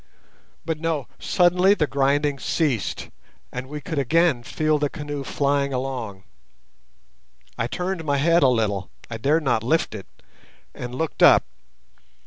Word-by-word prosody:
But 160 -1 -2
no, 160 -4 -2
suddenly 180 +2 +3
the 155 - +1
grinding 140 0 +1
ceased, 140 - -1 0.4
and 125 +1 -6
we 150 +1 -5
could 160 0 -3
again 155 -1 +2
feel 155 +4 0
the 145 -1 0
canoe 145 -1 -5
flying 140 0 0
along. 125 -7 -4 1.3
I 115 - -1
turned 180 +4 -3
my 145 -2 0
head 170 +4 +3
a 135 - +6
little—I 110 -1 -2
dared 150 +7 +2
not 120 -5 +1
lift 160 +9 0
it—and 120 +4 -12
looked 160 +3 -3
up. - - +7
145 Hz, 130 wpm, -23 LUFS, 125-160 Hz, 1.3 s, up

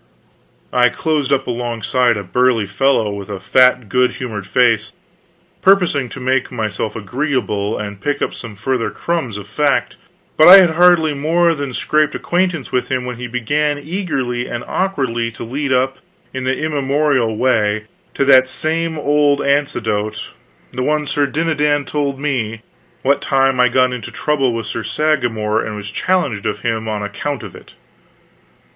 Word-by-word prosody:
I 125 0 +4
closed 150 +1 -1
up 135 -1 +1
alongside 120 0 0
of 100 - -5
a - - -19
burly 125 +1 +2
fellow 110 +2 +1
with 100 -1 -7
a 100 -2 -5
fat 125 +4 +3
good 125 +4 +2
humored 110 -7 -6
face, 120 -1 +2 0.7
purposing 180 -9 +3
to 140 - -9
make 130 +1 0
myself 110 -2 -3
agreeable 110 -2 -2
and 100 -2 -6
pick 145 +5 -1
up - - -2
some 115 -4 -9
further 125 +3 -1
crumbs 160 -11 -3
of 100 - -8
fact; 145 +3 0 0.4
but 155 - +7
I 185 +2 +12
had 180 -4 +6
hardly 165 -2 +4
more 165 +4 +2
than 145 -3 -4
scraped 150 +4 0
acquaintance 175 -5 -1
with 125 - -1
him 130 -1 -1
when 125 -1 -5
he 120 0 -5
began 145 +5 -1
eagerly 140 -7 -3
and 120 -1 -5
awkwardly 130 -12 -1
to 110 - -8
lead 135 +4 -3
up, 130 +1 +1 0.3
in 130 -1 -4
the 130 0 0
immemorial 140 -6 0
way, 110 -4 +1 0.3
to 140 - +1
that 130 -1 +6
same 160 +4 -2
old 145 -1 +2
anecdote 140 -7 -1 0.4
the 125 - -4
one 150 +3 0
Sir 145 0 0
Dinadan 150 -1 0
told 140 -2 -2
me, 115 -6 -2 0.4
what 140 +2 +2
time 135 -1 +1
I 125 -1 +5
got 130 +1 +2
into 125 - -6
trouble 135 -4 0
with 115 -1 -4
Sir 115 - -4
Sagramor 110 -3 0
and 110 - -5
was 105 0 -7
challenged 140 - -1
of 105 - -3
him 110 -1 -2
on 105 -1 -3
account 125 +6 -4
of 100 -4 -9
it. - - -15
130 Hz, 165 wpm, -17 LUFS, 115-145 Hz, 0.7 s, I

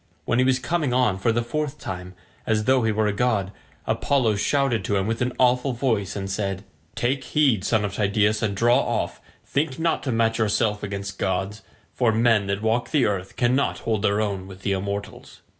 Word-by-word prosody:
When 120 - +1
he 130 - +4
was 130 -1 +3
coming 150 -1 -1
on 125 -7 +2
for 115 - +2
the 120 +1 0
fourth 150 +4 -3
time, 90 -4 -7 0.3
as 110 -1 +1
though 130 +2 +3
he 110 -1 +1
were 110 0 +1
a 105 - +1
god, 105 -4 0 0.3
Apollo 120 -7 +1
shouted 135 -2 +1
to 105 - 0
him 95 -1 +1
with 115 +2 -2
an 125 +1 +1
awful 125 +1 +2
voice 115 -6 -1
and 100 -1 -4
said, 95 -1 -3 0.3
"Take 130 +4 0
heed, 130 -7 +2
son 105 0 +1
of 100 - -4
Tydeus, 105 +1 +1
and 105 -3 -1
draw 120 +4 +4
off; - - -2 0.2
think 140 -2 -1
not 165 0 0
to 130 - -2
match 115 0 +1
yourself 105 -1 +1
against 100 -1 -5
gods, 95 +2 -2 0.3
for 120 -3 +2
men 110 -2 +3
that 100 +2 -2
walk 115 +2 +1
the 145 -5 +2
earth 95 -2 -2
cannot 125 +3 +1
hold 110 -3 0
their 100 0 +2
own 100 -3 -2
with 95 0 -12
the 100 - 0
immortals." 100 +1 -5
110 Hz, 205 wpm, -24 LUFS, 100-125 Hz, 0.3 s, he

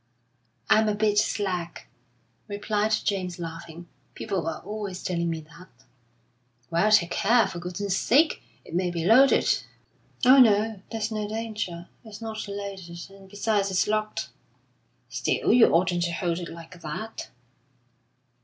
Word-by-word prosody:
"I 215 - +5
am 220 0 +2
a 210 - 0
bit 210 0 +2
slack," 185 -6 -2 0.6
replied 210 +1 -1
James, 185 -4 -2
laughing. 165 0 -8 0.3
"People 190 -6 -3
are 165 - -3
always 205 -1 -6
telling 170 -2 -1
me 165 -1 -3
that." 165 +4 -15 1.0
"Well, 170 +6 +3
take 185 -5 +4
care, 230 +3 +4
for 175 - -6
goodness' 180 +2 -2
sake! 300 +6 +3 0.2
It - - -12
may 180 +1 +1
be 170 -1 -3
loaded." 255 +7 +5 0.7
"Oh, 260 +2 +8
no, 215 -3 +4
there's 225 0 -2
no 215 -1 -2
danger. 210 -6 -4 0.2
It's 215 -3 -10
not 220 -1 -5
loaded, 195 -3 -7
and 195 -1 -15
besides, 205 0 0
it's 185 -1 +2
locked." 215 0 -1 0.8
"Still, - - 0
you 240 -2 +7
oughtn't 175 +1 +2
to 170 - -2
hold 170 0 -1
it 175 - -6
like 170 +1 -11
that." 165 +9 -6
200 Hz, 145 wpm, -26 LUFS, 175-215 Hz, 1.0 s, Oh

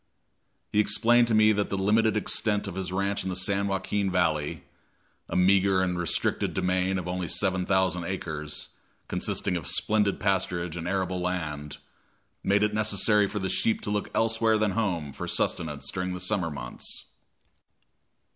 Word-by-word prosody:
He 105 - +2
explained 120 +3 +4
to 115 - +2
me 110 0 +6
that 105 -1 0
the 100 - -2
limited 110 +3 +2
extent 105 -1 +1
of 100 - -5
his 95 -1 -4
ranch 100 +1 -1
in 95 - -3
the 90 - -3
San 100 +2 +1
Joaquin 100 +1 -1
Valley 80 -5 0 0.7
a - - -4
meager 95 +1 +4
and 90 -1 -1
restricted 85 -5 -1
demesne 95 +1 +1
of 90 -1 -4
only 90 0 -3
7,000 95 -1 +1
acres, 80 -5 -5 0.4
consisting - - -1
of 80 -6 -3
splendid 105 -2 +1
pasturage 90 -4 -1
and 85 0 -5
arable 95 -1 -1
land 75 -5 -3 0.7
made 100 +1 +2
it 105 0 +1
necessary 105 -1 +3
for 105 - -5
the 95 -2 -1
sheep 110 +4 +1
to 105 - -4
look 105 0 -2
elsewhere 115 0 +2
than 105 -1 +1
at - - -6
home 85 -10 -1
for - - -6
sustenance 75 -4 -2
during 90 0 -3
the - - -6
summer 90 -2 -1
months. 65 -5 -4
95 Hz, 165 wpm, -27 LUFS, 90-105 Hz, 0.7 s, me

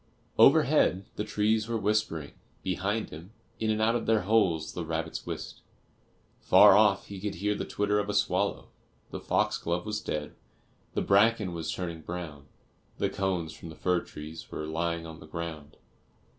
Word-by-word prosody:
Overhead 95 +2 +5
the 105 - -2
trees 105 +1 +1
were 115 -1 -1
whispering; 105 -8 -1 0.3
behind 100 +4 -1
him, 85 +7 -10 0.3
in 110 - 0
and 110 0 +1
out 110 +1 +3
of 120 - -2
their 110 -1 +3
holes 90 -6 +1
the 90 - -4
rabbits 80 0 -4
whisked; - - -6 0.8
far - - +7
off 100 -2 +4
he 100 -2 -8
could 105 -3 -3
hear 105 +4 0
the - - -4
twitter 105 0 0
of 105 0 -2
a 105 - -1
swallow; - - 0 0.4
the - - -5
foxglove 85 +2 0
was 105 0 -3
dead, 75 -1 -4 0.6
the - - +1
bracken 105 -1 +3
was 80 -2 -3
turning 85 -3 -4
brown, 80 -4 -7 0.5
the - - 0
cones 90 -5 -2
from 85 - -10
the 80 - -10
fir 90 +1 +1
trees 80 0 -9
were 75 - -5
lying 85 +1 -2
on 80 0 -9
the 80 - -12
ground. 80 -2 -7
90 Hz, 170 wpm, -29 LUFS, 80-105 Hz, 0.8 s, far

